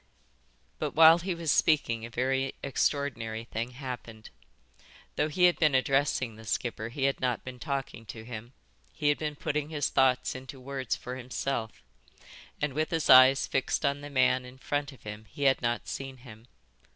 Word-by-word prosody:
But - - -3
while 165 +1 +8
he 180 +1 -3
was 165 -3 0
speaking 115 -8 +2
a 115 - -6
very 130 +3 -1
extraordinary 120 -5 -1
thing 115 +2 -5
happened. 120 -4 -8 0.8
Though - - +1
he 180 +4 0
had 180 -1 +5
been 155 -4 +4
addressing 130 -3 +1
the 110 - -12
skipper 110 +1 -3
he 135 +3 -4
had 135 0 +1
not 125 -2 -1
been 130 -1 -8
talking 135 -6 -4
to 110 +1 -8
him, 120 +1 -8 0.4
he 150 - 0
had 145 - +1
been 150 -1 -3
putting 150 +1 -2
his 150 -3 -1
thoughts 130 -1 +2
into 130 +1 -9
words 135 -1 -3
for 125 +1 -7
himself, 125 - -4 0.8
and 150 -3 -1
with 155 +3 -1
his 165 -2 +2
eyes 130 +1 +8
fixed 135 +3 -1
on 140 0 0
the 145 - -8
man 130 -2 +2
in 125 +1 -12
front 145 +2 -2
of 135 - -17
him 105 +1 -8
he 145 - -6
had 135 -1 +4
not 120 -1 -1
seen 135 -1 -6
him. 120 -2 -14
130 Hz, 180 wpm, -29 LUFS, 120-145 Hz, 0.8 s, while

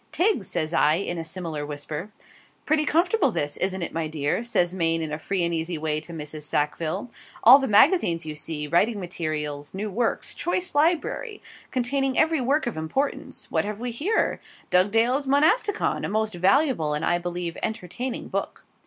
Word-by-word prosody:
'Tiggs!' 355 - +1
says 160 -1 -1
I, 155 -1 +4
in 175 -1 -3
a - - -3
similar 160 -2 -4
whisper. 150 +5 -6 0.6
'Pretty 305 0 +2
comfortable 340 +2 +2
this, 145 -10 -2
isn't 190 -1 -1
it, - - -4
my 165 -1 -1
dear?' 150 +4 -1
says 180 -7 +1
Maine 165 -2 +1
in 155 - -4
a 150 - -3
free 190 +2 -1
and 170 0 0
easy 165 +1 -2
way 155 0 -1
to 155 +3 -10
Mrs. 155 -1 -7
Sackville; 155 +8 -2 0.3
'all 255 +5 +10
the 270 - -1
magazines, 200 - +4
you 155 - -4
see 150 0 -4
writing 200 +8 +2
materials 155 -4 -4
new 205 +2 -3
works 230 +4 -1
choice 360 +1 -2
library, 340 +8 0 0.3
containing 265 +1 0
every 315 -2 +3
work 280 +5 +1
of 240 -8 -3
importance 265 - -3
what - - +1
have 210 0 -5
we 245 +1 -3
here? 335 - 0 0.3
"Dugdale's 225 +9 +3
Monasticon," 315 - +2
a - - -2
most 215 +1 0
valuable 185 - +2
and, 150 - -2
I 175 - +2
believe, 175 -1 -4
entertaining 220 +4 -4
book.' - - -4
185 Hz, 175 wpm, -25 LUFS, 160-265 Hz, 0.6 s, all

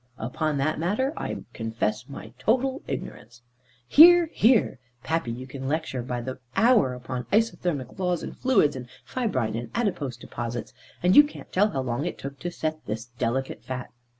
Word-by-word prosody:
"Upon 145 +6 -2
that 155 +3 0
matter, 215 - 0
I - - -4
confess 110 0 -2
my 115 -5 -9
total 260 - +1
ignorance." 120 +3 -7 0.4
"Hear, 340 - +8
hear! 220 - +3 0.2
Pappy, 160 -2 -1
you 125 +2 -6
can 130 0 -7
lecture 150 -3 -2
by 120 0 -3
the 130 +2 -6 0.2
hour 225 - +4
upon 125 0 -5
isothermic 180 - 0
laws, 180 -2 0
and - - -6
fluids, 200 - +3
and 125 -2 -7 0.2
fibrine, 130 - -1
and 120 +1 -4
adipose 170 - -1
deposits, 120 -1 -6 0.3
and 180 +3 +4
you 295 - +11
can't 295 - -10
tell 205 +3 +4
how 135 -9 -2
long 125 +5 -2
it - - -5
took 140 0 -8
to 175 - -3
set 155 -2 -4
this 110 +1 -3
delicate 130 +3 -2
fat. 130 -1 -6
140 Hz, 170 wpm, -26 LUFS, 125-205 Hz, 0.4 s, you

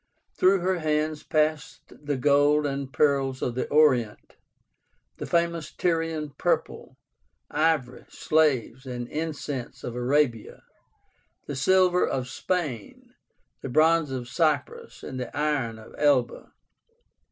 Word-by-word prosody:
Through 190 0 +3
her 185 0 0
hands 155 -1 -1
passed 155 -1 -1
the 145 -1 -5
gold 145 +2 +3
and 140 -1 -3
pearls 135 -3 +1
of 120 - -1
the 125 - -3
Orient; 130 -8 +2 0.8
the - - -6
famous 170 -2 0
Tyrian 165 -3 -1
purple; - - -2 0.5
ivory, 150 -5 0
slaves, 135 -4 0
and 120 -1 -5
incense 150 -5 -5
of 120 - -5
Arabia; 125 -2 0 0.8
the 145 - -5
silver 180 +5 +3
of 130 -1 -2
Spain; 145 - -4 0.5
the - - -5
bronze 160 +3 +3
of 130 -2 -5
Cyprus; 170 - -1
and 130 - -6
the 125 +2 -6
iron 145 -7 -1
of 110 - -14
Elba. 140 -5 +1
145 Hz, 120 wpm, -26 LUFS, 130-160 Hz, 0.8 s, Through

